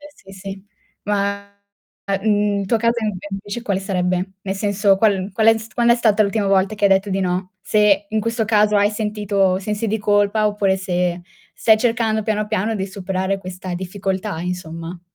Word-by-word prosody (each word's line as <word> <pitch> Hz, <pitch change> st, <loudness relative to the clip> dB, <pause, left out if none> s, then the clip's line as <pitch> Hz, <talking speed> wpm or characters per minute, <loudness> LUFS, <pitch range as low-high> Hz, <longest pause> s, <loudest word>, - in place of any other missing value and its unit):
Sì 195 Hz, -, -16 dB
sì. 195 Hz, +1 st, -8 dB, 0.4 s
Ma 200 Hz, 0 st, -1 dB, 0.7 s
mhmm, 205 Hz, -1 st, +1 dB
il 195 Hz, -, -4 dB
tuo 230 Hz, -, +2 dB
caso 230 Hz, +1 st, +1 dB, 0.3 s
invece 200 Hz, +4 st, -5 dB
quale 200 Hz, -4 st, -1 dB
sarebbe? 185 Hz, -1 st, -1 dB
Nel 195 Hz, -1 st, -3 dB
senso 200 Hz, 0 st, +2 dB
qual 200 Hz, -2 st, +1 dB
qual 220 Hz, +3 st, +2 dB
è 225 Hz, -, +7 dB, 0.2 s
quando 235 Hz, 0 st, +4 dB
è -, -, +1 dB
stata 220 Hz, -3 st, +3 dB
l'ultima 200 Hz, 0 st, 0 dB
volta 195 Hz, +1 st, +2 dB
che 205 Hz, -, +1 dB
hai -, -, +5 dB
detto 195 Hz, +1 st, +3 dB
di 195 Hz, -, -1 dB
no? 185 Hz, 0 st, -2 dB
Se 205 Hz, -1 st, +2 dB
in 220 Hz, -, 0 dB
questo 230 Hz, +1 st, -1 dB
caso 210 Hz, -1 st, +3 dB
hai 205 Hz, 0 st, +4 dB
sentito 205 Hz, -3 st, 0 dB
sensi 210 Hz, +3 st, -3 dB
di 220 Hz, -, 0 dB
colpa 205 Hz, +1 st, +2 dB
oppure 200 Hz, -2 st, +1 dB
se 180 Hz, -2 st, -1 dB, 0.3 s
stai 220 Hz, -1 st, +4 dB
cercando 220 Hz, -2 st, 0 dB
piano 210 Hz, -1 st, -1 dB
piano 220 Hz, +1 st, -1 dB
di 190 Hz, -2 st, -2 dB
superare 190 Hz, 0 st, -2 dB
questa 185 Hz, -1 st, -7 dB
difficoltà 190 Hz, 0 st, -3 dB
insomma. 170 Hz, -1 st, -6 dB
200 Hz, 180 wpm, -20 LUFS, 190-215 Hz, 0.7 s, è